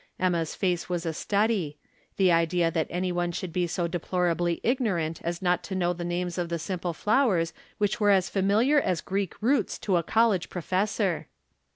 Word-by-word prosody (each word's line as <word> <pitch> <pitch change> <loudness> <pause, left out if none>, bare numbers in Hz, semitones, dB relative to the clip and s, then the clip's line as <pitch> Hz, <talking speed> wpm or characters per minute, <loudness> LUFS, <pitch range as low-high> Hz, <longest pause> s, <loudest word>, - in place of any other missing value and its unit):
Emma's 170 -3 0
face 180 -3 -1
was 175 -1 -2
a 165 - -1
study. 200 -4 0 0.4
The 190 -2 +4
idea 165 0 +2
that 160 -1 0
any 180 +1 -1
one 175 0 -1
should 170 0 -5
be 180 0 +1
so 170 0 -1
deplorably 175 0 0
ignorant 195 - 0
as 170 +2 -3
not 180 -1 +2
to 190 - -4
know 175 -1 +1
the 175 0 -6
names 175 +1 -2
of 175 -1 -2
the 170 - -1
simple 175 +1 -3
flowers 195 - +2 0.2
which 205 +1 0
were 205 -1 +3
as 195 -2 +4
familiar 210 +10 +3
as 180 -7 0
Greek 195 -2 -3
roots 270 +5 +2
to 190 -4 +1
a - - +2
college 220 -1 +2
professor. 185 +1 -1
180 Hz, 185 wpm, -27 LUFS, 170-200 Hz, 0.4 s, The